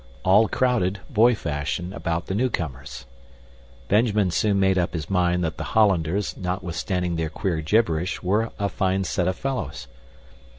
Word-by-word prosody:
All 105 Hz, +4 st, +5 dB
crowded, 110 Hz, -7 st, +1 dB
boy 120 Hz, +1 st, +5 dB
fashion, 85 Hz, +1 st, -3 dB
about 85 Hz, -2 st, -2 dB
the -, -, -4 dB
newcomers. 85 Hz, -, -3 dB, 0.8 s
Benjamin 105 Hz, -3 st, +2 dB
soon 100 Hz, +2 st, +1 dB
made 95 Hz, -1 st, +3 dB
up 85 Hz, 0 st, -1 dB
his 80 Hz, +2 st, -5 dB
mind 90 Hz, -1 st, +2 dB
that 80 Hz, -1 st, -2 dB
the -, -, -4 dB
Hollanders, 95 Hz, -2 st, +2 dB
notwithstanding 90 Hz, -1 st, -2 dB
their 80 Hz, -1 st, -1 dB
queer 85 Hz, -2 st, -2 dB
gibberish, 85 Hz, 0 st, 0 dB
were 105 Hz, +5 st, +1 dB
a 100 Hz, -1 st, 0 dB
fine 95 Hz, 0 st, 0 dB
set 90 Hz, -1 st, -1 dB
of 95 Hz, -, 0 dB
fellows. 130 Hz, -, -4 dB
95 Hz, 145 wpm, -24 LUFS, 85-105 Hz, 0.8 s, All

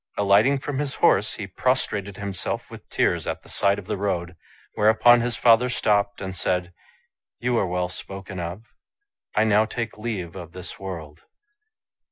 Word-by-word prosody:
Alighting 100 Hz, +7 st, +4 dB
from 135 Hz, 0 st, -4 dB
his 145 Hz, -2 st, -2 dB
horse, 105 Hz, +3 st, +3 dB
he 105 Hz, -, -5 dB
prostrated 100 Hz, -2 st, -1 dB
himself 100 Hz, -3 st, -4 dB
with -, -, -12 dB
tears -, -, +1 dB
at -, -, -3 dB
the -, -, -12 dB
side 100 Hz, 0 st, +2 dB
of 100 Hz, -, -7 dB
the 100 Hz, -, -3 dB
road; 90 Hz, -3 st, -2 dB, 0.4 s
whereupon 115 Hz, +3 st, +5 dB
his 120 Hz, 0 st, -1 dB
father 120 Hz, +1 st, +5 dB
stopped 100 Hz, -4 st, +1 dB
and 95 Hz, -1 st, -5 dB
said, 90 Hz, 0 st, -1 dB, 0.3 s
" -, -, -65 dB
You 125 Hz, 0 st, 0 dB
are 95 Hz, -, +1 dB
well 90 Hz, 0 st, -1 dB
spoken 95 Hz, +1 st, -8 dB
of. 85 Hz, +5 st, -5 dB, 0.7 s
I 110 Hz, -, +4 dB
now 110 Hz, 0 st, +4 dB
take 115 Hz, -1 st, -5 dB
leave 100 Hz, -7 st, -4 dB
of 85 Hz, -3 st, -9 dB
this 90 Hz, 0 st, -8 dB
world." 80 Hz, -5 st, -7 dB
100 Hz, 170 wpm, -24 LUFS, 90-115 Hz, 0.7 s, whereupon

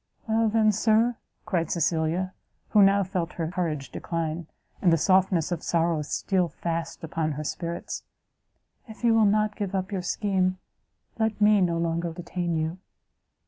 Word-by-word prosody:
"Well, 225 Hz, 0 st, +2 dB
then, 215 Hz, 0 st, +4 dB
Sir," 225 Hz, +3 st, +2 dB, 0.3 s
said 170 Hz, -6 st, 0 dB
Cecilia, 170 Hz, +2 st, 0 dB, 0.4 s
who 210 Hz, -, +5 dB
now 200 Hz, 0 st, +5 dB
felt 180 Hz, -2 st, -3 dB
her 165 Hz, -1 st, -3 dB
courage 155 Hz, -7 st, -2 dB
decline, 165 Hz, -1 st, -3 dB, 0.3 s
and 180 Hz, -, +4 dB
the 165 Hz, -, +4 dB
softness 185 Hz, -1 st, +3 dB
of 170 Hz, -2 st, -2 dB
sorrow 165 Hz, -2 st, +1 dB
steal 180 Hz, +4 st, 0 dB
fast 165 Hz, +2 st, -4 dB
upon 160 Hz, -1 st, -2 dB
her 150 Hz, +2 st, -4 dB
spirits, 170 Hz, +3 st, -4 dB, 0.9 s
"if 220 Hz, +1 st, -12 dB
you 235 Hz, -1 st, +5 dB
will 225 Hz, -1 st, +5 dB
not 210 Hz, +1 st, +2 dB
give 200 Hz, -2 st, -3 dB
up 190 Hz, +1 st, -2 dB
your 190 Hz, -2 st, -1 dB
scheme, 185 Hz, 0 st, 0 dB, 0.6 s
let 220 Hz, -1 st, 0 dB
me 210 Hz, -1 st, +5 dB
no 170 Hz, -2 st, +2 dB
longer 170 Hz, 0 st, -1 dB
detain 175 Hz, 0 st, -3 dB
you." 160 Hz, +3 st, -2 dB
180 Hz, 155 wpm, -26 LUFS, 165-205 Hz, 0.9 s, who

